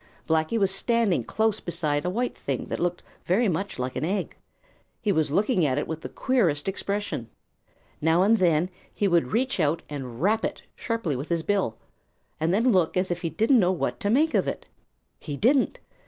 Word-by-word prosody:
Blacky 160 +7 +1
was 195 -3 +2
standing 230 -1 +1
close 220 -1 0
beside 150 -3 -1
a - - +1
white 240 +6 -1
thing 135 -3 -3
that - - -3
looked 175 0 -1 0.2
very 215 +7 +2
much 190 +2 -2
like 125 0 -3
an 130 - -2
egg. 190 +4 -2 0.6
He 210 - 0
was 160 -4 +1
looking 195 - +2
at 135 -3 +1
it 145 - -1
with 160 0 -5
the - - -6
queerest 190 - +1
expression. 200 - -3 0.7
Now 160 +3 +4
and 220 +3 +4
then 175 0 +2 0.2
he 205 - 0
would 170 -8 +3
reach 255 +1 0
out 160 +1 +1
and 130 -5 -6
rap 215 +6 +2
it - - -3
sharply 230 - -2
with 135 +5 -5
his 170 -1 0
bill, 185 - 0 0.6
and 160 +2 +1
then 230 +6 +3
look 180 -4 +2
as 185 0 0
if 175 - -2
he 165 - -1
didn't 225 - +3
know 185 -2 +3
what 185 - -2
to 205 -3 -1
make 300 +8 +3
of - - +2
it. - - -4 0.5
He 145 -3 -6
didn't. 260 - +3
180 Hz, 200 wpm, -26 LUFS, 160-215 Hz, 0.7 s, Now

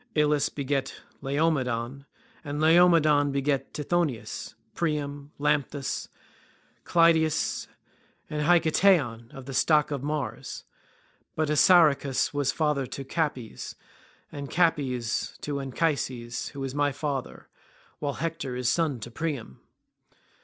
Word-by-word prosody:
Ilus 150 -1 +3
begat 140 -1 -2 0.3
Laomedon, 135 -3 -1 0.4
and 145 -1 -4
Laomedon 155 -3 +5
begat 140 0 -1
Tithonus, 145 -9 -2 0.2
Priam, 145 -3 -3
Lampus, 145 -1 -1 0.8
Clytius, 165 -2 +3 0.6
and 150 0 -3
Hiketaon 160 - +3
of 135 -1 -10
the 135 - -7
stock 150 +2 +3
of 140 -3 -2
Mars. 140 -6 -4 0.7
But 155 -1 0
Assaracus 150 -5 +4
was 145 -2 +1
father 150 -3 0
to 135 - -6
Capys, 135 -5 -3 0.6
and 140 -1 -6
Capys 135 -9 0
to 145 -1 -3
Anchises, 130 -4 -2
who 140 - -8
was 135 -1 -3
my 145 0 +1
father, 140 -2 -4 0.5
while 145 -2 -2
Hector 160 -6 -4
is 125 0 +1
son 155 -7 0
to 120 - -7
Priam. 140 - -4
145 Hz, 110 wpm, -27 LUFS, 135-155 Hz, 0.8 s, Laomedon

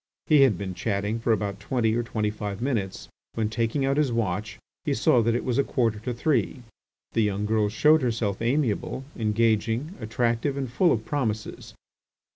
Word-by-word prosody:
He 150 -3 +5
had 125 -9 +5
been 95 -1 -4
chatting 105 +3 -2
for 115 0 0
about 100 -2 -1
twenty 120 -4 0
or 120 - +1
twenty 110 -2 -2
five 105 -2 -5
minutes, 115 -7 -2 0.3
when, 110 -2 0
taking 115 +4 0
out 135 +1 +1
his 150 -4 +2
watch, 105 -1 -2 0.3
he 145 -4 0
saw 120 0 +4
that 115 +1 +1
it 120 - -1
was 125 0 0
a - - +4
quarter 115 -7 0
to 125 +4 -4
three. 125 -1 0 0.5
The 115 - +1
young 105 -1 0
girl 105 -1 +1
showed 150 +9 +4
herself 115 -5 -1
amiable, 125 0 0
engaging, 115 - +1
attractive, 120 +4 -1
and 135 -1 -2
full 170 +7 +3
of 110 -2 0
promises. 110 -7 -3
115 Hz, 180 wpm, -26 LUFS, 105-130 Hz, 0.5 s, He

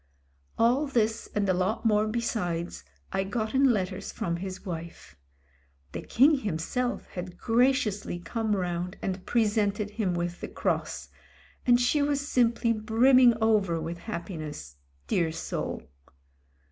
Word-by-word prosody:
All 250 +6 +3
this 230 -4 0
and 205 -1 +1
a 185 - +3
lot 185 +6 -1
more 215 -1 +3
besides 205 -7 -2 0.3
I 195 0 +1
got 215 +3 -3
in 270 -1 +5
letters 195 -2 -2
from 170 -1 -2
his 190 +1 -6
wife. 170 -2 -7 0.8
The - - -5
King 280 +4 +4
himself 220 +5 -2
had 180 0 -7
graciously 235 -5 +1
come 220 +4 -1
round 180 -1 -3
and 185 -1 -3
presented 210 -2 +1
him 200 -5 -1
with 175 0 -3
the - - -4
cross - - -2 0.3
— - - -28
and 245 0 +6
she 250 +4 +2
was 285 0 0
simply 235 -2 +2
brimming 240 +3 +5
over 200 -7 +2
with 165 +2 -5
happiness, 160 - -6 0.3
dear 165 - +1
soul. 160 - -4
210 Hz, 135 wpm, -28 LUFS, 180-235 Hz, 0.8 s, and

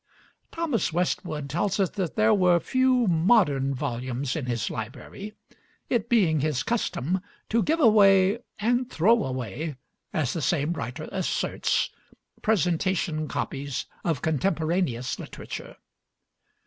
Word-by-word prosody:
Thomas 305 - -1
Westwood 155 -4 -1
tells 175 +8 -1
us 190 -3 +2
that 185 -5 -3
there 220 0 +4
were 180 -4 +4
few 255 +2 +2
modern 160 - +3
volumes 130 0 -3
in 145 -6 -3
his 120 -1 -1
library, 125 - -7 0.6
it 235 -2 0
being 180 -10 +3
his 145 -4 0
custom 180 - -1 0.3
to 230 +1 +2
give 320 +8 +1
away 200 -4 +5 0.2
and 245 +3 +1
throw 220 +7 +3
away 130 +4 -4 0.4
(as 145 -5 0
the 165 - -3
same 150 +2 +1
writer 125 +1 -5
asserts) 185 -2 0 0.5
presentation 175 -5 +1
copies 140 -2 -3 0.2
of 160 -7 -1
contemporaneous 160 -5 0
literature. - - -8
170 Hz, 120 wpm, -26 LUFS, 140-210 Hz, 0.6 s, away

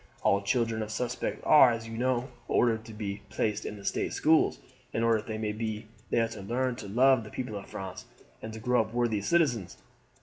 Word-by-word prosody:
All 100 0 +3
children 115 +1 0
of 105 - -4
suspects 125 +2 -3
are, 150 -4 +8
as 115 -1 -3
you 115 - -7
know, 125 +1 0 0.2
ordered 115 -2 +2
to 115 - -9
be 100 -2 -4
placed 105 -2 -1
in 105 - -6
the 100 - -12
state - - -1
schools, 160 0 +3 0.4
in 115 - 0
order 115 -1 +3
that 105 - -10
they 110 -1 -3
may 110 -1 -2 0.6
there 115 -1 +2
learn 125 +5 -1
to 105 - -7
love 125 +3 +4
the 105 - -10
people 125 -3 -5
of 100 - -7
France 95 -1 -7 0.4
and 110 - -6
to 110 - -7
grow 125 +1 +2
up 110 +2 -6
worthy 120 -4 +1
citizens. 120 - +1
115 Hz, 205 wpm, -29 LUFS, 105-125 Hz, 0.6 s, are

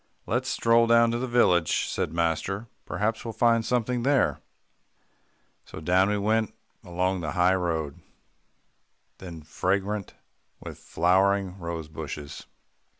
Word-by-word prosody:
"Let's - - -1
stroll 115 0 +3
down 115 0 +5
to 120 - -1
the 130 - -2
village," 90 -9 +2
said - - -2
master. 85 +5 -1 0.2
"Perhaps 110 +2 -2
we'll 115 - -5
find 115 0 +3
something 125 +1 0
there." 135 +2 +2 1.2
So - - -10
down 90 +5 +2
we 105 - +1
went 110 +2 0 0.3
along 90 +1 -1
the 80 -2 -4
high 90 0 +3
road, 80 -6 -2 1.2
then 85 -4 -9
fragrant 100 +5 -2 0.4
with - - -9
flowering 95 +2 +1
rosebushes. 80 -3 -7
95 Hz, 120 wpm, -26 LUFS, 85-115 Hz, 1.2 s, down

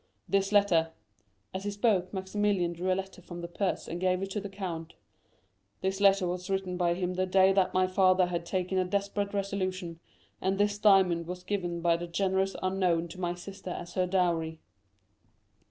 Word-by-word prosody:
This 195 0 +1
letter" 175 -6 +3 0.6
(as 190 +1 -4
he 205 - -2
spoke, 200 -3 +1
Maximilian 190 -2 0
drew 180 +2 -1
a - - +3
letter 190 -1 -6
from 175 -1 -8
the 170 - -5
purse 185 +2 -2
and 170 +2 -5
gave 185 0 +1
it 195 - -5
to 210 - -2
the 200 - -6
count)—"this 165 - -7
letter 195 -1 +5
was 180 +2 -4
written 190 -2 -1
by 175 -1 +1
him 180 0 -2
the 185 +1 0
day 190 +1 +5
that 190 -2 +2
my 185 0 +4
father 185 0 +4
had 175 -1 -3
taken 185 +1 -1
a - - +3
desperate 200 +1 -1
resolution, 185 -4 -3 0.4
and 190 +1 0
this 205 0 +1
diamond 185 -5 +4
was 180 0 -6
given 175 -3 -2
by 170 -1 +3
the 175 +1 -5
generous 190 +2 0
unknown 180 -3 +1
to 180 - -10
my 175 0 -1
sister 190 +1 -9
as 175 0 -6
her 185 -1 +1
dowry." 170 -3 0
185 Hz, 185 wpm, -29 LUFS, 175-195 Hz, 0.6 s, letter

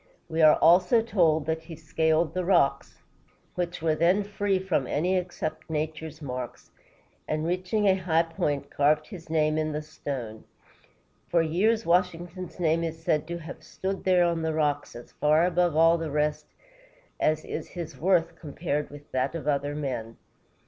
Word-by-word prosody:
We 160 -1 -1
are 155 -1 +8
also 180 +7 +5
told 165 -9 +2
that 160 0 -1
he 165 0 -10
scaled 160 +1 0
the 185 - -1
rocks, 140 -7 +1 0.5
which 175 -2 -4
were 160 -1 +3
then 175 +6 +3
free 200 -1 0
from 185 -8 -1
any 180 +6 0
except 180 -4 -4
nature's 155 0 -4
marks, 125 -3 -6 0.6
and 155 +1 -1
reaching 185 +5 0
a 190 - +6
high 170 -3 +1
point, 145 -4 -3
carved 150 +2 +2
his 170 -5 -11
name 155 -1 +1
in 155 -1 -1
the 150 0 -3
stone. 130 -8 -6 0.9
For 170 -1 +3
years, 215 +8 +1
Washington's 175 0 -1
name 165 -1 +2
is 165 0 -5
said 155 -1 +1
to 170 0 -4
have 165 -1 -9
stood 190 0 -4
there 180 -2 +4
on 170 -1 0
the 160 -1 -1
rocks, 150 -2 -1
as 120 - -11
far 155 +3 +3
above 175 -2 +1
all 165 +1 +5
the 165 -1 -3
rest 150 +1 -1 0.7
as 155 0 +1
is - - -5
his 170 -3 -7
worth 170 -1 +2
compared 150 -1 -3
with 145 0 -13
that 130 +5 -1
of 160 -3 -5
other 145 0 0
men. 125 -6 -4
160 Hz, 170 wpm, -27 LUFS, 150-175 Hz, 0.9 s, are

